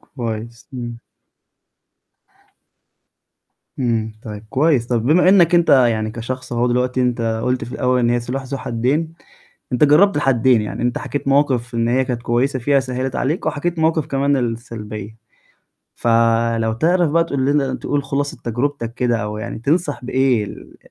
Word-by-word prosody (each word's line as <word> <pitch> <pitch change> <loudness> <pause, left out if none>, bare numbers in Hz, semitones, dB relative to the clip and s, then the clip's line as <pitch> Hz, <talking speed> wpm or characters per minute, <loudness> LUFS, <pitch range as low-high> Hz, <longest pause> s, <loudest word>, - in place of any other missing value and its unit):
كويس، 115 -2 -7
إمم. 120 -2 -6 2.8
إمم، 115 -3 -1
طيب 105 -1 -8
كويس. 135 -3 +2
طب 120 -2 0
بما 175 +5 +4
إنك 180 -3 +5
أنت 170 -2 +4
يعني 115 -5 +3
كشخص 130 +3 -6
أهو 120 +1 +1
دلوقتي 125 +1 0
أنت 115 -2 0
قلت 125 0 0
في 120 - -9
الأول 125 0 +1
إن 120 -1 +2
هي 120 0 +1
سلاح 125 +3 -4
ذو 135 +1 -5
حدين. 135 +8 -1 0.6
أنت 125 - +4
جربت 160 +7 +5
الحدّين، 130 -4 +3
يعني 105 - -5
أنت 120 0 0
حكيت 145 -1 -4
مواقف 130 -4 +1
إن 115 0 +1
هي 130 +2 +2
كانت 120 -2 -3
كويسة 130 +3 0
فيها 140 +3 +2
سهلت 130 0 -3
عليك، 155 +6 -1
وحكيت 170 +3 -2
مواقف 160 -1 +1
كمان 140 +1 +1
السلبية، 110 -3 -5 0.8
فلو 115 -1 +2
تعرف 170 +7 +2
بقى 165 +2 +3
تقول 140 -5 -1
لنا 140 -2 +1
تقول 145 +1 -2
خلاصة 140 +1 -2
تجربتك 120 0 -2
كده، 120 -2 +1
أو 105 0 -4
يعني 115 +1 -5
تنصح 145 +2 -1
بإيه 130 -4 +1
ال - - -11
125 Hz, 155 wpm, -19 LUFS, 115-140 Hz, 2.8 s, إنك